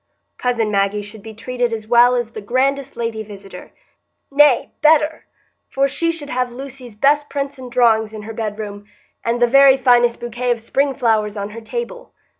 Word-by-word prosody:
Cousin 235 -4 0
Maggie 200 +1 0
should 210 +1 -12
be 220 +1 -10
treated 245 +1 -2
as 220 -1 -5
well 240 +1 +5
as 240 -2 -2
the 215 - -8
grandest 270 +4 -1
lady 230 -2 -3
visitor,—nay, 220 +7 -2
better, 310 0 +3 0.4
for 275 +1 +1
she 335 +5 -1
should 300 -3 -8
have 250 -1 -1
Lucy's 255 -2 -10
best 290 +5 +2
prints 280 -1 -4
and 250 -1 -9
drawings 225 -3 +3
in 215 -1 -8
her 225 +1 -7
bedroom, 210 -2 -6 0.4
and 230 +1 -1
the 240 - +5
very 275 +1 +6
finest 245 -2 +3
bouquet 240 +1 -4
of 240 -1 +1
spring 270 +4 0
flowers 220 -4 0
on 200 +1 -4
her 230 +2 -9
table. 480 - -6
240 Hz, 175 wpm, -19 LUFS, 220-275 Hz, 0.4 s, very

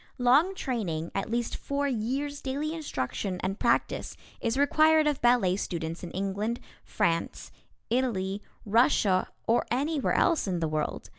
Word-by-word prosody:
Long 280 +10 +4
training, 180 - -3
at 195 - -2
least 235 0 -1
four 280 0 -2
years' 275 +4 -2
daily 285 +4 -2
instruction 190 - -3
and 195 +2 -2
practice, - - 0 0.2
is 230 +2 0
required 310 +2 +4
of 295 -2 0
ballet 240 -7 +4
students 165 -4 -4
in 175 - -5
England, 200 +5 -2 0.2
France, 170 -6 -1 0.4
Italy, 210 -6 0 0.2
Russia, 210 -4 +3 0.2
or 230 - +3
anywhere 285 +3 0
else 335 -10 +2
in 180 -2 -1
the 165 - 0
world. 155 -1 -3
235 Hz, 140 wpm, -28 LUFS, 190-280 Hz, 0.4 s, Long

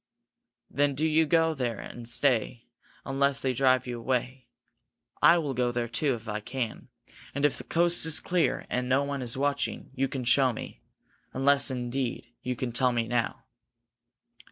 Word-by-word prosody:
"Then 145 0 +1
do 155 +4 0
you 160 0 +3
go 165 0 +3
there 125 -6 -2
and 120 -1 -8
stay, 120 -2 +1 0.4
unless 140 0 +1
they 130 -1 +1
drive 130 0 +3
you 120 -2 -5
away. 130 +1 -2 0.7
I 175 - +7
will 150 -5 -2
go 125 -1 0
there, 120 -1 -2
too, 135 +3 0
if 115 -1 -11
I 105 0 -2
can, 120 +1 -5 0.5
and 140 +1 +1
if 145 - +2
the - - -7
coast 175 +1 +2
is 160 -1 +5
clear 180 -2 0
and 125 0 -2
no 135 +2 +3
one 140 -1 -3
is 120 0 -2
watching, 140 +1 -2
you 135 +1 0
can 130 -1 -5
show 130 +1 +3
me. - - -9 0.5
Unless, 140 +1 +3
indeed, 125 -1 -4
you 125 0 -3
can 120 0 -3
tell 125 +2 +2
me 115 -1 -1
now?" 120 -1 -1
130 Hz, 175 wpm, -28 LUFS, 120-140 Hz, 0.7 s, I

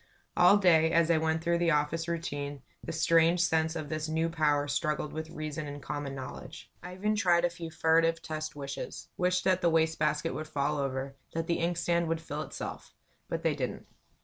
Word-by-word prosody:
All 180 +3 +7
day, 165 -5 +4
as 170 0 +4
I 160 - +4
went 160 0 0
through 170 0 +1
the 170 -1 +2
office 155 +2 +1
routine, 145 -5 -4 0.2
the - - -5
strange 165 +1 +3
sense 160 -1 +2
of 155 -2 -4
this 155 +1 -3
new 160 +1 0
power 150 -3 +1
struggled 150 +1 -1
with 160 0 -5
reason 155 -1 -5
and 145 0 -6
common 145 -1 -5
knowledge. 130 -1 -8
I 180 0 -8
even 210 +3 0
tried 175 -4 +3
a 175 - 0
few 170 -1 -7
furtive 165 +1 +2
test 155 -2 -5
"wishes" 140 -1 -6
wished 180 0 +1
that 185 -1 +2
the 170 - +4
waste 160 0 +2
basket 150 -3 0
would 155 +3 -5
fall 145 0 -1
over, 135 0 -2 0.2
that 165 0 -1
the 170 +1 0
inkstand 170 0 +1
would 165 0 0
fill 155 -2 -5
itself; - - -7 0.3
but - - -3
they - - +2
didn't. - - -4
160 Hz, 200 wpm, -30 LUFS, 150-170 Hz, 0.3 s, All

